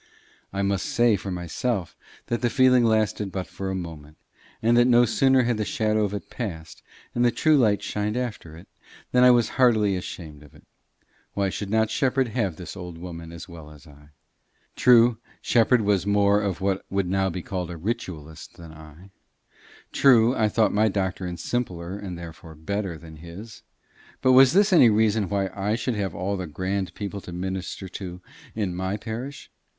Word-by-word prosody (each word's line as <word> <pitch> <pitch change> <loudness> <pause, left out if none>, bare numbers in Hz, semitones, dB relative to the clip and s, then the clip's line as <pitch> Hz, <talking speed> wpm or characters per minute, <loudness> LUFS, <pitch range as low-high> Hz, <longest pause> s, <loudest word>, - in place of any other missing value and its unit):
I 100 0 -2
must 100 -2 -1
say 120 -2 +3
for 100 0 -6
myself 90 +3 -3 0.3
that 120 - -2
the 120 - +2
feeling 130 -1 +4
lasted 110 -3 +1
but 95 -1 -4
for 95 -1 -6
a 95 - -2
moment, 80 -4 -8 0.4
and 115 +1 +2
that 120 0 +5
no 120 -1 +5
sooner 130 +2 +3
had 120 -2 0
the 110 - -1
shadow 110 0 0
of 100 -1 -2
it 100 - -8
passed 85 -9 -6 0.3
and 120 - +1
the 120 - +5
true 155 +6 +2
light 110 -7 +2
shined 105 +2 -2
after 105 -10 -5
it, 85 - -14 0.4
than 125 0 +4
I 125 - +8
was 120 -2 +4
heartily 110 -6 +4
ashamed 80 -5 -7
of 75 -2 -17
it. - - -19 0.7
Why 100 -1 +1
should 100 +1 -5
not 110 +1 +1
Shepherd 130 -1 +1
have 105 -6 -1
the 90 0 -10
old 90 -3 -8
woman 85 -1 -8
as 85 0 -9
well 80 -4 -11
as 75 -1 -16
I? 75 -1 -17 0.7
True, 120 -2 +5 0.2
Shepherd 120 +1 +3
was 100 -2 +1
more 100 0 +3
of 100 -4 -3
what 95 0 0
would 100 -1 -1
now 95 +1 +1
be 90 0 -5
called 90 -3 -4
a 85 - -6
ritualist 80 -6 -6
than 85 -2 -11
I; 80 +5 -14 0.8
true, 125 -2 +5
I 110 -1 +2
thought 110 +1 +2
my 105 +2 +3
doctrine 95 -3 -2
simpler 90 -8 -3
and 90 -4 -6
therefore 80 -1 -10
better 95 +2 -4
than 80 0 -13
his; 85 +8 -11 0.6
but 130 - +3
was 130 +1 +7
this 200 +1 +4
any 130 -9 +7
reason 105 -2 +2
why 100 -2 -1
I 100 +2 -1
should 125 +1 -2
have 100 -4 -3
all 100 +2 -2
the 90 -1 -5
grand 95 +3 -3
people 100 -1 -5
to 90 - -10
minister 95 +1 -5
to 90 -1 -7 0.4
in 100 -5 -2
my 95 +3 -2
parish! 120 +6 -7
100 Hz, 185 wpm, -24 LUFS, 90-115 Hz, 0.8 s, I